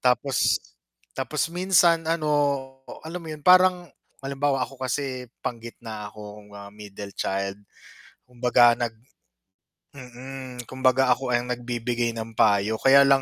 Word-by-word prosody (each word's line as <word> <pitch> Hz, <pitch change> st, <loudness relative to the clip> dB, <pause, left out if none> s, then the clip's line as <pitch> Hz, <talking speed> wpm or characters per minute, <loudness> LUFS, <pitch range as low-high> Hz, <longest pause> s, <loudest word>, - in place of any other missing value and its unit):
Tapos 130 Hz, +1 st, +2 dB, 0.6 s
tapos -, -, -1 dB
minsan 175 Hz, -2 st, +3 dB
ano, 165 Hz, -2 st, 0 dB, 0.8 s
alam 175 Hz, +2 st, -5 dB
mo 160 Hz, -, -9 dB
yun, 150 Hz, -1 st, -9 dB
parang 180 Hz, -1 st, +5 dB, 0.4 s
halimbawa 135 Hz, -1 st, 0 dB
ako 135 Hz, 0 st, -14 dB
kasi 130 Hz, -2 st, -3 dB, 0.2 s
panggitna 115 Hz, -3 st, -6 dB
akong, 105 Hz, 0 st, -12 dB
ah, 100 Hz, 0 st, -11 dB
middle 100 Hz, -1 st, -10 dB
child. 100 Hz, 0 st, -2 dB, 0.7 s
Kumbaga 120 Hz, -1 st, +4 dB
nag 120 Hz, -2 st, -2 dB, 1.0 s
mm, 130 Hz, -1 st, -9 dB
kumbaga 130 Hz, 0 st, +2 dB
ako 130 Hz, +1 st, -5 dB
ang 120 Hz, 0 st, +1 dB
nagbibigay 120 Hz, 0 st, -2 dB
ng 115 Hz, 0 st, -6 dB
payo. 105 Hz, +1 st, +2 dB
Kaya 140 Hz, +1 st, +7 dB
lang 135 Hz, 0 st, +4 dB
125 Hz, 125 wpm, -25 LUFS, 115-140 Hz, 1.0 s, Kaya